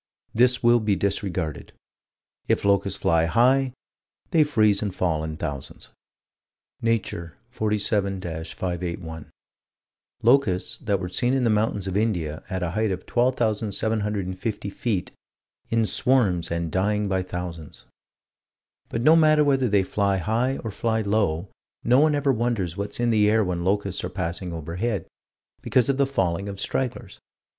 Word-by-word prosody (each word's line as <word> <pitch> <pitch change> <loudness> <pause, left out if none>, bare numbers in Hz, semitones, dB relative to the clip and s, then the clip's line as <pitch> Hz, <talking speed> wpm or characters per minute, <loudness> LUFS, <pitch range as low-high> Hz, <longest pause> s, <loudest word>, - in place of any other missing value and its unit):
This 125 +2 +3
will 120 0 +5
be 105 -2 +1
disregarded: 95 -6 -2 0.7
If - - +1
locusts 100 -1 +2
fly 80 0 +3
high, 125 +8 +3 0.6
they 160 -4 +5
freeze 110 -8 +2
and 105 -2 -1
fall 80 -4 0
in 80 0 -5
thousands. 70 -6 -6 0.9
Nature, 110 -7 -2
47 105 -3 0
581: 85 -1 -5 0.9
Locusts 115 -7 +3
that 100 -2 -1
were 90 - -4
seen 120 +8 +1
in 130 - +1
the 115 - +3
mountains 105 -2 0
of 95 -1 -3
India, 85 -8 -1
at 95 -2 -2
a 85 - -1
height 110 +3 0
of 95 -1 -4
12,750 105 -4 -1
feet 100 -4 -2 0.6
"in 115 -1 +2
swarms 105 -8 +2
and 85 -1 -2
dying 105 +3 +1
by 95 -1 0
thousands." 90 -4 -7 1.0
But 115 - -2
no 155 +4 +7
matter 155 -2 +5
whether 135 -3 +2
they 100 -3 +3
fly 100 0 0
high 115 +8 0
or 110 - -4
fly 110 +2 0
low, 100 -4 0 0.3
no 125 +2 +4
one 150 0 +4
ever 140 -1 +2
wonders 110 -8 -1
what's 100 +3 -5
in 120 -1 +2
the 105 -2 +4
air 110 0 +3
when 90 -2 -2
locusts 100 0 -1
are - - -3
passing 90 -1 -4
overhead, 85 +7 -3 0.6
because 125 -1 +2
of 135 - +1
the 140 -1 +2
falling 95 -6 -1
of 100 -1 -7
stragglers. 125 -3 -3
100 Hz, 145 wpm, -24 LUFS, 90-115 Hz, 1.0 s, no